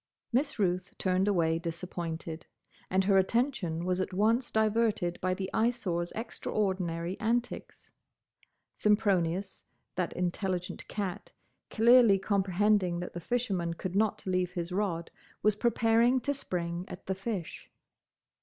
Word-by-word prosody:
Miss 280 +4 +1
Ruth 185 -2 0
turned 185 +1 +1
away 165 -5 +2
disappointed, 170 -1 -5 0.4
and 190 +1 +2
her 195 0 +4
attention 190 - 0
was 185 0 +1
at 185 - -3
once 225 +5 +2
diverted 215 -5 +1
by 185 0 +1
the 190 0 -3
Eyesore's 205 -7 0
extraordinary 185 -6 -2
antics. 235 +2 -2 0.8
Sempronius, 195 -3 +1 0.3
that 180 -2 -1
intelligent 180 0 -2
cat, 200 0 -4 0.4
clearly 235 -2 +6
comprehending 195 -1 +1
that 180 - -6
the 175 - -4
fisherman 185 -5 -1
could 185 +2 -5
not 215 0 +1
leave 185 -1 0
his 175 0 -4
rod, 180 -4 -1 0.3
was 215 -1 +4
preparing 230 +2 +3
to 285 - 0
spring 175 -9 -3
at - - -9
the 190 - -1
fish. 195 -2 -5
190 Hz, 125 wpm, -30 LUFS, 175-220 Hz, 0.8 s, clearly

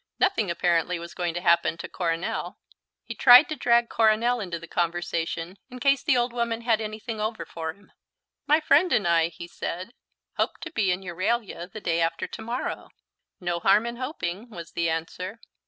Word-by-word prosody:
Nothing 370 - +2
apparently 170 0 +1
was 170 0 -8
going 175 -2 -2
to 175 - -2
happen 170 -2 +3
to - - -6
Coronel. 170 -1 -3 0.5
He 230 - -5
tried 245 +6 +8
to 310 - -2
drag 235 -3 +3
Coronel 230 +2 +3
into 180 -5 -4
the 170 - -10
conversation 170 +1 -2
in 250 - -9
case 275 0 +3
the 295 -6 +2
old 240 0 0
woman 235 -1 -1
had 230 -2 +2
anything 215 +1 -5
over 220 +1 -3
for 160 -1 -5
him. 200 - -24 0.6
"My 300 +2 +5
friend 310 +4 +4
and 205 - +2
I," 165 -1 +4
he 170 0 -9
said, 180 +5 -5 0.4
"hope - - 0
to 330 - -6
be 210 - +1
in 180 +2 -2
Euralia 185 +1 -2
the 215 - -8
day 170 -2 0
after 165 0 0
to - - -8
morrow." 235 +3 -4 0.5
"No 175 -1 -2
harm 195 +5 +4
in 235 0 -4
hoping," 235 - -4
was 170 -6 -9
the 170 -1 0
answer. 180 +6 -4
200 Hz, 190 wpm, -26 LUFS, 170-235 Hz, 0.6 s, tried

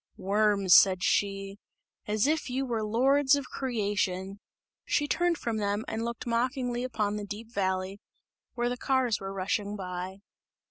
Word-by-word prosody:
"Worms!" 200 -1 +3
said 185 -1 +6
she, 195 0 0 0.5
"as 210 +1 +1
if 305 -2 0
you 265 +2 -1
were 235 -3 -2
lords 265 +6 +3
of 280 -2 -3
creation!" 200 -6 -2 0.4
She 290 - 0
turned 345 +2 +1
from 230 -4 -2
them 205 +1 -1
and 220 +1 -3
looked 235 0 -4
mockingly 245 +1 -1
upon 210 -5 -1
the 210 - -4
deep 215 +3 -8
valley, 190 0 -1 0.5
where 240 0 0
the 245 +1 -2
cars 255 -5 +1
were 195 0 -5
rushing 200 +2 -2
by. 185 0 -6
210 Hz, 150 wpm, -29 LUFS, 195-250 Hz, 0.5 s, said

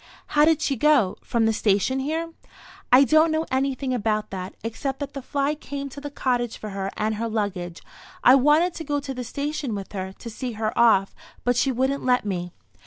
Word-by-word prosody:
"How 295 0 +6
did 320 -1 +3
she 275 - +1
go? 265 -7 +3
From 230 -2 0
the 225 - +2
station 210 +5 +1
here?" 325 +4 -3 0.6
"I 255 +2 +8
don't 310 +3 +4
know 315 +1 0
anything 265 0 0
about 215 -2 -1
that, 185 -1 -6
except 260 +4 -3
that 285 -1 -5
the 275 - -5
fly 280 +2 -1
came 280 -2 -6
to 285 +2 -10
the 290 - -5
cottage 245 -4 -1
for 215 - -7
her 195 0 -3
and 215 +1 0
her 230 +1 -2
luggage. 190 -6 -3 0.4
I 250 - +8
wanted 300 +6 +4
to 330 - -6
go 290 -1 -1
to 275 -1 -5
the 250 -1 -5
station 280 -1 -3
with 195 -1 -7
her, 190 -2 -4
to 230 +4 -10
see 245 +2 -5
her 215 0 -2
off, 220 -5 +4 0.3
but 245 0 +2
she 265 +3 +2
wouldn't 265 +3 0
let 250 -3 +2
me." 180 -3 -3
255 Hz, 210 wpm, -24 LUFS, 215-285 Hz, 0.6 s, I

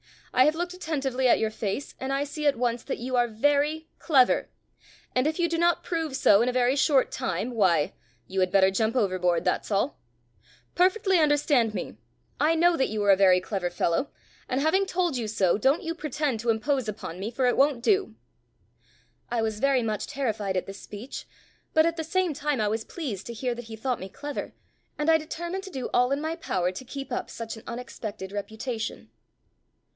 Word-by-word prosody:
I 255 +1 +6
have 305 +1 +3
looked 350 +2 -3
attentively 275 -7 -1
at - - +5
your 220 -1 0
face 215 +5 -4
and 265 +1 -3
I 275 +1 +1
see 295 +1 -3
at 285 - +4
once 240 0 -1
that - - -3
you 255 +2 -3
are 240 0 +3
very 290 +7 +1
clever, 265 -6 +3 0.6
and 255 +3 +2
if 315 - -1
you 345 - +3
do 335 0 -1
not 345 0 +2
prove 325 -5 -2
so 205 -5 +5
in 245 - +2
a - - -2
very 250 +1 +3
short 275 -1 +3
time, 190 +7 -2
why 185 -10 +2 0.3
you 190 0 -3
had 185 -1 +3
better 190 -1 +5
jump 220 +4 0
overboard, 185 -6 +1
that's - - 0
all. 210 +7 0 0.7
Perfectly 375 +1 +3
understand 290 -7 +3
me. - - -5 0.4
I 315 +2 +3
know 345 +1 +4
that 265 - +2
you 215 -1 -2
are 200 - +5
a - - +7
very 185 -2 +6
clever 185 -1 -3
fellow, 175 +8 0 0.4
and 255 - 0
having 380 +6 +2
told 350 -7 0
you 230 -3 -2
so, 200 -4 +2
don't 270 +8 +2
you 330 - -2
pretend 300 -6 -2
to 235 +2 -2
impose 250 +2 +1
upon 195 -4 -6
me, 200 +3 -3
for 255 +2 -1
it 245 - +2
won't 275 -4 +3
do." 390 +5 +2 1.1
I 235 -2 0
was 220 -1 -2
very 270 -1 +3
much 215 -2 -2
terrified 220 -9 -2
at 185 - -1
this 195 0 -9
speech, 215 +6 -8 0.5
but 315 0 +6
at 335 0 0
the 320 - -2
same 365 0 0
time 290 -1 -1
I 210 - +1
was 220 +1 -1
pleased 240 - -5
to 235 - -5
hear 245 +2 -2
that 240 0 -8
he 225 0 -8
thought 245 +2 -2
me 190 - -7
clever, 290 +8 -6 0.4
and 300 +2 +2
I 320 - +5
determined 345 +5 -5
to - - -7
do 265 -8 -4
all 250 0 +4
in 280 +1 0
my 320 +1 -2
power 180 - -1
to 185 +8 -8
keep 275 +1 -7
up - - -3
such 230 0 -6
an 220 - -12
unexpected 220 -5 -6
reputation. 220 +3 -5
255 Hz, 210 wpm, -27 LUFS, 215-300 Hz, 1.1 s, a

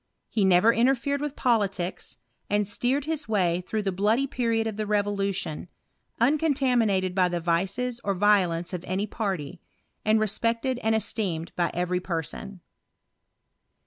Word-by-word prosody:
He 215 - 0
never 190 +4 +5
interfered 265 +4 +1
with 295 -1 -3
politics, 195 -7 -1 0.3
and 205 -1 +1
steered 255 +7 0
his 310 -5 -2
way 180 -5 +1
through 215 -1 -1
the 195 - 0
bloody 210 +8 +2
period 230 -4 0
of 220 -2 -3
the 215 0 -3
re 210 0 +3
*v©lution, 200 -6 -2 0.5
uncontaminated 245 - +2
by 185 -1 +3
the 175 0 -2
vices 195 +9 -1
or 200 -1 0
violence 180 -4 +2
of 180 -1 -4
any 190 +3 -1
party, 185 -8 -4 0.4
and 215 +1 +3
respected 230 +4 0
and 220 0 +2
esteemed 190 -6 -2
by 175 -1 +1
every 180 +1 0
person. 180 +2 -5
205 Hz, 145 wpm, -26 LUFS, 180-235 Hz, 0.5 s, never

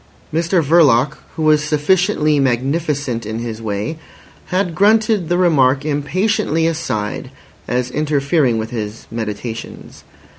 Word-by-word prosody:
Mr 170 +2 +1
Verloc, 145 -3 +4 0.2
who 160 - -3
was 155 -1 +4
sufficiently 155 0 +2
magnificent 135 -1 -1
in 110 +1 -5
his 115 -1 -5
way, 110 +8 -3 0.5
had 180 -1 -1
grunted 210 -1 +2
the 175 - +2
remark 140 -6 +3
impatiently 160 +3 0
aside 155 -11 -2 0.4
as 125 0 -1
interfering 145 -3 +1
with 110 0 -4
his 110 -2 -5
meditations. 110 0 -6
150 Hz, 115 wpm, -18 LUFS, 120-165 Hz, 0.5 s, Verloc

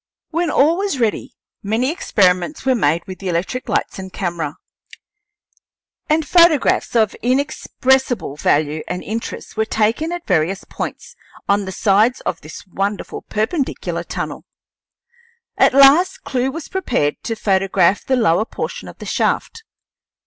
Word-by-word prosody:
When 340 +1 0
all 310 +4 +3
was 390 -8 -2
ready 225 -3 -1 0.3
many 225 +7 0
experiments 190 - +1
were 265 - +4
made 170 -7 +1
with 185 -2 -8
the 195 - -4
electric 180 +9 -2
lights - - -1
and 190 0 -7
camera, 170 -6 -3 1.5
and 310 0 +2
photographs 335 -8 +4
of 220 -3 +3
inexpressible 260 - 0
value 150 +1 +1
and 180 0 -4
interest 225 +2 -6
were 220 0 +1
taken 225 +10 0
at 350 -1 -5
various 180 +1 0
points - - -7 0.3
on 200 0 +2
the 190 - -5
sides 210 +5 +2
of - - -3
this 155 +1 -10
wonderful 195 +2 -3
perpendicular 255 +7 -2
tunnel. - - -5 1.1
At - - +4
last 335 +8 +6
Clewe 265 -2 -1
was 315 +3 -6
prepared 250 - -1
to 225 - -2
photograph 195 -2 +2
the 265 - +1
lower 215 -4 +2
portion - - -6
of - - -11
the - - -9
shaft. 460 - -1
220 Hz, 140 wpm, -19 LUFS, 190-275 Hz, 1.5 s, last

